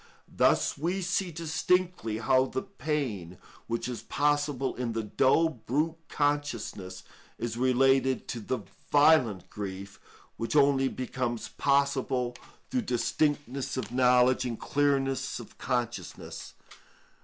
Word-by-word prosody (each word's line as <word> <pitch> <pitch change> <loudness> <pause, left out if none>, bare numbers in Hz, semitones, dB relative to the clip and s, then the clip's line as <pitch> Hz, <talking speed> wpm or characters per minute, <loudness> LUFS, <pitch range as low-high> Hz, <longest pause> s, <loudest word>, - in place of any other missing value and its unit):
Thus - - +3
we 180 +5 -1
see 185 +1 0
distinctly 165 -6 0
how 130 +3 +3
the 130 - -3
pain 125 - -3 0.3
which 115 0 -2
is 120 -4 -5
possible 145 +1 0
in 120 -2 -2
the 115 0 -2
dull 130 +9 +3
brute 150 +5 -2
consciousness 145 -10 -2 0.3
is 115 -1 -3
related 130 +1 +3
to 120 - -3
the 115 +2 -3 0.3
violent 145 - +4
grief, 100 -1 -6 0.4
which 115 +2 -3
only 140 -2 +4
becomes 125 -2 -3
possible 135 -3 +1 0.4
through 255 - +1
distinctness 140 - -1
of 115 -4 -4
knowledge 125 0 +4
and 120 -3 -4
clearness 135 -3 0
of - - -12
consciousness. 120 -2 -4
130 Hz, 115 wpm, -29 LUFS, 120-145 Hz, 0.4 s, violent